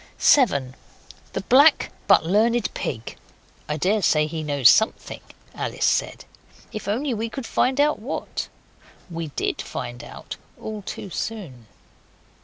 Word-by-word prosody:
7. 140 - +3 0.6
The - - -2
Black 275 +10 +5 0.2
but - - +5
Learned 225 +6 +2
Pig. 115 -4 -5 0.5
['I 150 - -1
daresay 180 -3 +2
he 160 +1 -4
knows 145 -5 +3
something,' 220 - +3 0.3
Alice - - -2
said, - - 0 0.5
'if 215 - -6
we 200 - +2 0.4
can 270 - -6
only - - -10
find 260 +3 0
out 300 +1 +3
what.' 235 +6 -4 0.6
We 165 -1 -4
DID 145 - -2
find 120 0 -6
out - - -9 0.2
all 215 -1 -6
too 195 0 -7
soon.) 155 - -6
195 Hz, 130 wpm, -23 LUFS, 150-225 Hz, 0.6 s, Black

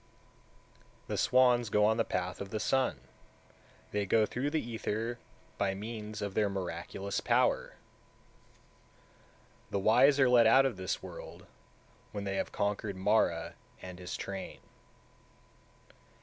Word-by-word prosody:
175. - - -31
The - - -2
swans 125 -2 +4
go 105 0 +3
on 110 +1 +3
the 115 - +3
path 90 -2 -3
of 100 - -6
the 110 - -3
sun, 130 - 0 0.9
they 105 -1 -1
go 110 +2 +4
through 130 +6 -2
the 160 +1 0
ether 115 +1 -3 0.4
by 95 -1 0
means 105 0 -6
of 100 -1 -4
their 105 0 +2
miraculous 95 +1 -4
power; - - +1 1.9
the - - -1
wise 125 +8 +5
are 135 - +6
led 120 -2 +6
out 130 +4 +6
of 130 -5 0
this 95 -2 -3
world, - - -10 0.7
when 100 -1 -4
they 100 -1 -2
have - - -2
conquered 100 0 -2
Mara 95 -3 +1 0.3
and 90 -1 -9
his 90 +1 -5
train. 95 -1 -6
105 Hz, 135 wpm, -31 LUFS, 95-115 Hz, 1.9 s, are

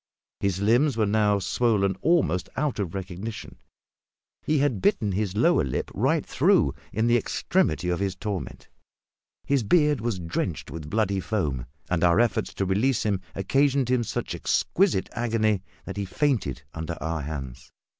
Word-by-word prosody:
His 95 -2 0
limbs 120 +6 +3
were 110 - +3
now 105 0 +2
swollen 100 -1 +1
almost 160 - +2
out 145 -7 -1
of 95 -3 -3
recognition; 95 +3 -6 0.8
he 155 - +1
had 135 -8 +1
bitten 105 +2 +2
his 100 0 -1
lower 170 - +4
lip 65 -3 -3
right - - +1
through - - +3 0.2
in 110 +3 0
the 120 0 +4
extremity 90 -6 0
of 90 -1 0
his 95 -2 -1
torment; 100 -1 -5 0.8
his 140 -2 +2
beard 150 - +3
was 115 -4 -1
drenched 85 -5 -3
with 75 -1 -7
bloody 100 -1 +1
foam; 80 - -2 0.2
and 90 -1 0
our 85 +3 +5
efforts 115 -2 +1
to 95 - -1
release 105 +7 +1
him 100 -3 0
occasioned 135 +5 +2
him 125 -2 +2
such - - -3
exquisite 185 - +1
agony 110 -4 0 0.2
that - - -6
he 100 - -2
fainted 90 - -1
under 80 0 -5
our 80 -1 -2
hands. 70 -4 -7
100 Hz, 155 wpm, -26 LUFS, 90-120 Hz, 0.8 s, our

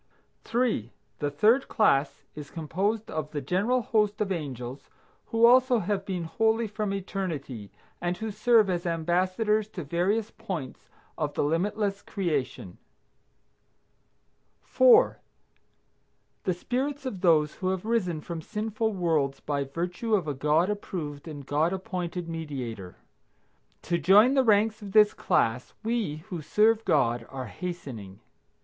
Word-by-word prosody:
3. 225 - 0 0.3
The 145 - 0
third 215 - +3
class 145 - +2
is 150 -1 -9
composed 195 +7 -2
of 155 -1 -3
the 150 - -3
general 200 - 0
host 210 -2 +1
of 205 -2 -1
angels 135 -6 -5 0.4
who 230 +1 +4
also 250 +1 +6
have 195 -1 -2
been 185 -3 -2
holy 220 +7 +1
from 210 -1 -3
eternity, 165 - -4 0.3
and 175 +1 -1
who 220 -1 -4
serve 215 +1 +4
as 175 -1 -1
ambassadors 185 +6 +1
to 195 -5 -7
various 190 +9 0
points 185 - -7 0.3
of 150 -2 -2
the - - +1
limitless 200 +6 0
creation. 145 - -3 1.8
4. - - +5 1.3
The 185 - +2
spirits 270 +8 -3
of 205 -8 -4
those 155 -4 +4
who 185 - -1
have 190 +1 -2
risen 185 -9 0
from 165 +1 -6
sinful 220 +3 -2
worlds 155 -7 0
by 140 -1 -2
virtue 175 - -2
of 180 -6 -1
a 145 - -1
God 150 +6 +2
approved 160 -8 -5
and 145 -3 -8
God 150 +5 +1
appointed 180 -2 -4
Mediator. 130 - -6 0.9
To 170 -1 0
join 205 - +6
the 270 -1 +4
ranks 215 -1 +3
of 200 -2 -8
this 210 -1 +6
class 115 +3 0
we, 215 -10 -2
who 175 -3 -4
serve 215 +7 +3
God, 120 -5 +1
are 130 -1 -6
hastening. 115 - -7
180 Hz, 135 wpm, -27 LUFS, 150-215 Hz, 1.8 s, also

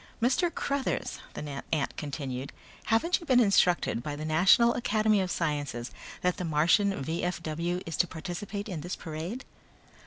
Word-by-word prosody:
"Mr. 265 +9 +2
Cruthers," 280 -4 -2 0.2
the 145 -2 -5
ant 150 -3 0
continued, 140 -3 -4 0.3
"haven't 225 +12 +2
you 340 - -11
been 255 -2 +5
instructed 180 - +3
by 145 +3 -4
the 155 +1 -5
National 190 +9 +5
Academy 215 -3 +2
of 185 - -2
Sciences 145 -8 -2 0.3
that 180 0 +1
the - - -3
Martian 165 +3 +2
V.F.W. 170 +2 -2
is 165 - -4
to 175 - +3
participate 195 +5 -5
in 175 -7 -4
this 175 +3 -4
parade?" 170 - -6
175 Hz, 150 wpm, -29 LUFS, 155-215 Hz, 0.3 s, been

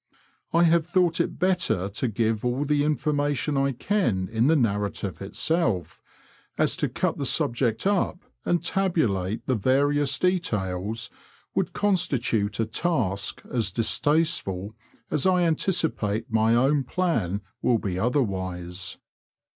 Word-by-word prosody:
I 170 +1 +4
have 170 -1 +3
thought 175 -2 +2
it - - -1
better 170 - +1
to 100 +6 -2
give 110 0 0
all 125 +4 0
the 145 0 +2
information 145 -1 0
I 135 0 +2
can 120 - 0
in 115 +3 +2
the 160 - +4
narrative 105 - -1
itself, 110 - -1 0.6
as - - +2
to - - 0
cut - - -1
the - - -1
subject 120 +1 +1
up 195 -2 +1 0.3
and 175 - 0
tabulate 115 - 0
the 130 - +1
various 140 +4 +2
details 110 - -1 0.4
would - - -1
constitute 120 - 0
a 115 - +2
task 110 - -1
as 115 -5 +1
distasteful 115 - 0 0.4
as 150 - +2
I 180 -1 +3
anticipate 155 - 0
my 110 +1 +4
own 135 +3 +3
plan 120 - -1 0.2
will 120 - +3
be 95 -4 -3
otherwise. 95 -7 -2
125 Hz, 130 wpm, -25 LUFS, 105-160 Hz, 0.6 s, I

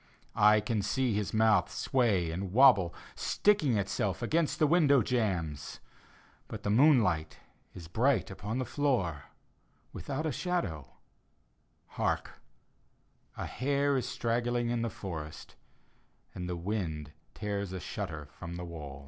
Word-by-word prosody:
I 105 +1 +5
can 105 0 -1
see 115 +5 0
his 105 0 -1
mouth 110 -6 +3
sway 105 -10 +1
and 90 +2 -4
wobble, 100 -7 +6 0.2
Sticking 190 - +2
itself 100 +2 -1
against 155 +5 +1
the 155 - +4
window 145 -5 +4
jambs. 90 - -2 0.7
But - - -8
the 100 - 0
moonlight 110 - +3 0.4
is 85 -3 -9
bright 110 -1 0
on 110 +4 -2
the 130 - -1
floor. 110 - -1 0.7
Without 145 +3 -4
a 155 - 0
shadow. 125 - -3 1.1
Hark - - -1 1.0
I - - -3
A - - -10
bare 140 +2 +2
is 125 -2 -1
strangling 120 0 -1
in 120 -1 0
the 115 - -1
forest, 80 -7 -7 0.8
And 90 -1 -5
the 90 - -3
wind 85 -6 -3 0.2
tears 100 -2 -3
a 95 - -4
shutter 85 -6 -5
from 85 -1 -8
the 90 0 -5
wall. 75 -5 -8
105 Hz, 135 wpm, -31 LUFS, 90-130 Hz, 1.1 s, wobble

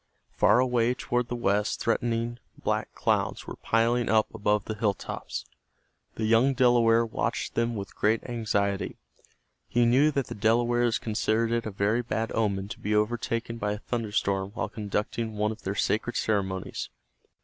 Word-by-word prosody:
Far 105 - +4
away 125 -1 +2
toward 120 -1 -1
the 120 - -3
west 105 -3 0
threatening 115 0 -1 0.2
black - - -1
clouds - - 0
were - - -7
piling 115 +1 +1
up 110 -1 +2
above 105 -2 +1
the 110 - -3
hill 105 -2 0
tops. 60 -6 -6 0.7
The 110 - -2
young 115 +5 +4
Delaware 120 -2 +4
watched 110 - -2
them 115 0 0
with 100 -3 -6
great 110 +2 +1
anxiety. 100 -4 -1 0.7
He 120 0 +2
knew 130 +6 +5
that 140 -3 -1
the - - -7
Delawares 120 +2 +2
considered 110 +1 0
it 115 -1 0
a - - -2
very 100 +4 +1
bad 115 -1 -2
omen 100 -3 0
to 105 - -7
be 105 +1 -1
overtaken 115 +1 -1
by 105 -1 -1
a - - -4
thunder 115 0 -3
storm 95 -2 0
while - - -2
conducting 110 +2 -3
one 105 +1 +1
of 110 - -8
their 95 +1 -3
sacred 110 +4 0
ceremonies. 95 -3 -2
115 Hz, 165 wpm, -27 LUFS, 105-120 Hz, 0.7 s, knew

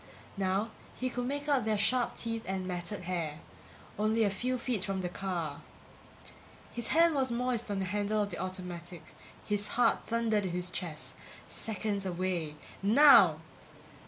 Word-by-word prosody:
Now 195 +3 0 0.2
he 255 0 -2
could 245 0 -2
make 285 +2 -3
out 280 -5 +3
their 215 -1 +1
sharp 245 +4 +1
teeth 230 -1 -2
and 190 -1 -2
matted 180 +2 -3
hair. 170 -4 -3 0.6
Only 220 +2 +3
a 205 - +2
few 250 +6 -1
feet 235 -5 -1
from 190 -1 -2
the 180 - -2
car... 175 -6 -3 1.1
His 235 -1 -1
hand 335 +1 +5
was 265 -3 +1
moist 240 -1 -1
on 200 - -1
the 190 - -1
handle 205 +2 0
of 205 - -5
the - - -5
automatic; 180 -2 -6 0.4
his 205 -1 0
heart 245 +3 +2
thundered 230 -2 +1
against 180 -2 -2
his 180 0 -2
chest. 165 -5 -5 0.4
Seconds 205 -2 -2
away... 175 -4 -2 0.3
Now! 275 +9 +7
205 Hz, 160 wpm, -31 LUFS, 185-235 Hz, 1.1 s, Now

